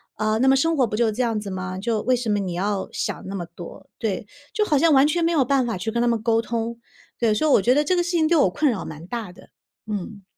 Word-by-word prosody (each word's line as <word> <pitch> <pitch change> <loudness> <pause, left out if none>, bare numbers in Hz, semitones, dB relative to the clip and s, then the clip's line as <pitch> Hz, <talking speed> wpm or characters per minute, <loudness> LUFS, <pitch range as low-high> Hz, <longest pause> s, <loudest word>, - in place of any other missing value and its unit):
呃， 215 +1 0
那 265 - +3
么 270 - +6
生 325 +3 +1
活 255 -3 +3
不 210 - -3
就 235 0 +2
是 - - +1
这 240 +4 -2
样 230 -3 0
子 210 -1 -5
吗？ 185 0 -5
就 220 0 -1
为 255 0 +3
什 240 -2 -3
么 205 -1 +2
你 185 -3 -3
要 195 +2 -2
想 - - -3
那 195 - -5
么 175 -3 -4
多？” 170 0 -12
对， 210 -2 -2 0.3
就 425 - +1
好 305 -8 +2
像 320 +1 +4
完 270 +1 +6
全 335 +3 +1
没 335 - +1
有 285 -4 +4
办 265 -1 +1
法 225 - -2
去 220 +5 -3
跟 235 +1 0
他 240 - +2
们 230 -2 0
沟 225 -1 +2
通。 230 0 -3 0.4
对， 220 -3 +2
所 310 - +1
以 - - +3
我 200 - +5
觉 250 +5 +3
得 295 - +3
这 365 +5 +1
个 350 - +2
事 345 - -3
情 330 -3 +2
对 340 - +3
我 280 - +4
困 285 - +1
扰 195 -6 -4
蛮 160 +1 -9
大 220 -3 -5
的。 180 - -17 0.4
嗯。 205 -1 -5
230 Hz, 325 characters per minute, -23 LUFS, 205-270 Hz, 0.4 s, 么